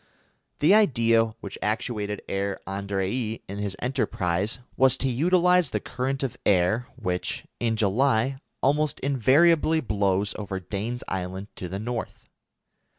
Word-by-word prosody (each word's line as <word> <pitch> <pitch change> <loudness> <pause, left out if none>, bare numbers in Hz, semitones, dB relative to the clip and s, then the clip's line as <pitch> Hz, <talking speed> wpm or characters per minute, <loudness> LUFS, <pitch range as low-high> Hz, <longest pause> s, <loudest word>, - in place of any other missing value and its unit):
The 160 +6 +6
idea 115 - +4 0.2
which 100 - -7
actuated 105 -1 -2
Herr 100 0 -2
Andrée 100 +4 -2
in 100 +1 -6
his 100 -2 -3
enterprise 100 -5 -1 0.2
was 130 -1 +4
to 135 - -1
utilise 180 +5 +3
the - - -1
current 135 +2 -3
of 130 - -3
air 100 +6 +2
which, 90 0 -3
in 115 -1 +1
July, 120 +4 +2 0.2
almost 150 +2 +2
invariably 150 +5 +4
blows 100 -5 0
over 100 -2 -4
Dane's 105 +6 -4
Island 95 +2 -4
to 90 - -5
the 95 - -4
North. 115 +3 -5
115 Hz, 130 wpm, -26 LUFS, 100-135 Hz, 0.2 s, The